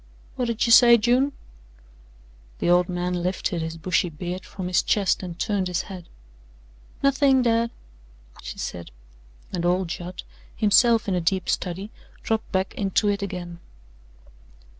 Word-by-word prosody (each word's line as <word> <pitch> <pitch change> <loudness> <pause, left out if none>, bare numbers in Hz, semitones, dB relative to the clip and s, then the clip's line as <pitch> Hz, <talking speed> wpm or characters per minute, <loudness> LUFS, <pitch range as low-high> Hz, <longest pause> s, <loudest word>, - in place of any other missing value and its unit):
"Whut'd 235 -3 -1
you 230 - +1
say, 235 0 +8
June?" 245 +5 +2 1.3
The 175 - +1
old 180 +1 +3
man 180 0 -2
lifted 180 -1 -2
his 160 0 -5
bushy 175 +2 0
beard 175 +3 -6
from 185 -2 -6
his 180 0 +2
chest 200 -3 +1
and 175 -3 -7
turned 200 -3 -1
his 180 -2 -1
head. 185 -4 -10 0.9
"Nothin', 275 -1 +4
dad," 230 0 +2 0.7
she - - -8
said, 85 -5 -6 0.6
and 175 - -2
old 180 0 +1
Judd, 180 +1 -6 0.3
himself 230 +2 +4
in 195 - 0
a 180 - 0
deep 185 +3 0
study, 190 +4 -2 0.3
dropped 220 -1 -2
back 190 0 -1
into 205 +1 0
it 200 0 -1
again. 175 -3 -6
190 Hz, 140 wpm, -24 LUFS, 175-225 Hz, 1.3 s, say